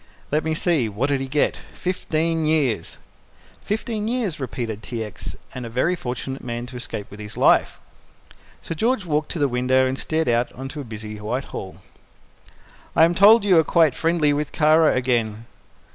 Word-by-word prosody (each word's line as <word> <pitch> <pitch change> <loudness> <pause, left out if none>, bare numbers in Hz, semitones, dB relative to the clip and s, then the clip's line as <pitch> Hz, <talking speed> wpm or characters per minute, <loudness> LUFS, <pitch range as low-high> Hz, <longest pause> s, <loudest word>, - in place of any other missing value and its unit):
"Let 150 +2 +1
me 160 0 -1
see, 155 -9 +1
what 115 +8 -1
did 140 -2 +1
he 135 - -3
get 145 +2 +1 0.2
fifteen 165 -2 -1
years!" 145 - 0 0.6
"Fifteen 215 0 -3
years," 225 -9 -1
repeated 115 -5 -4
T. 110 +3 -4
X., 105 - -7 0.2
"and 130 - -6
a 115 - -6
very 130 +10 +1
fortunate 130 -2 -5
man 120 -1 -4
to 125 +1 -10
escape 120 -4 -5
with 100 - -11
his 105 +1 -8
life." - - +3 0.8
Sir - - -4
George 220 +4 0
walked 150 -2 -1
to - - -4
the 145 -2 +2
window 130 +1 +2
and 130 +1 -2
stared 160 0 -1
out 120 +1 +1
on 135 +1 -7
to 145 0 -6
busy 110 -2 -8
Whitehall. 105 -3 -5 1.1
"I - - +6
am 170 +1 +5
told 210 +5 +7
you 185 -5 +5
are - - +4
quite 160 -3 +3
friendly 160 -2 +2
with 150 0 -2
Kara 155 +1 +4
again." 115 -4 0
140 Hz, 175 wpm, -23 LUFS, 120-165 Hz, 1.1 s, told